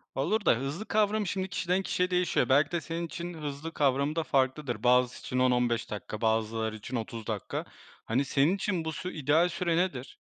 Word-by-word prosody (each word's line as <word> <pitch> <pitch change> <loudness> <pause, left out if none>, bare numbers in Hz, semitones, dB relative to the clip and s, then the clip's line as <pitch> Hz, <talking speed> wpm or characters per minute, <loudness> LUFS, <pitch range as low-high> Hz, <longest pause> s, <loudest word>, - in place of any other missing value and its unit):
Olur 205 - 0
da - - +6
hızlı 140 - -4
kavramı 215 -1 +1
şimdi 190 +1 -2
kişiden 180 +1 0
kişiye 180 -1 0
değişiyor. 180 -4 +1
Belki 145 +3 +4
de 170 - -1
senin 165 +2 -4
için 170 +2 -6
hızlı 150 0 -6
kavramı 140 +1 +1
da 165 - 0
farklıdır. 135 -2 0
Bazısı 125 0 +3
için 125 - -3
10-15 125 -2 +2
dakika, 105 +1 -6
bazıları 110 0 0
için 110 +4 -7
30 115 -1 -5
dakika. 105 -3 -3 0.4
Hani, 130 +5 +1
senin 140 +7 +3
için 185 -4 -2
bu 160 - -1
sü 180 +3 -5
ideal 155 +4 +3
süre 170 -1 0
nedir? 140 -8 -2
145 Hz, 185 wpm, -29 LUFS, 125-175 Hz, 0.4 s, da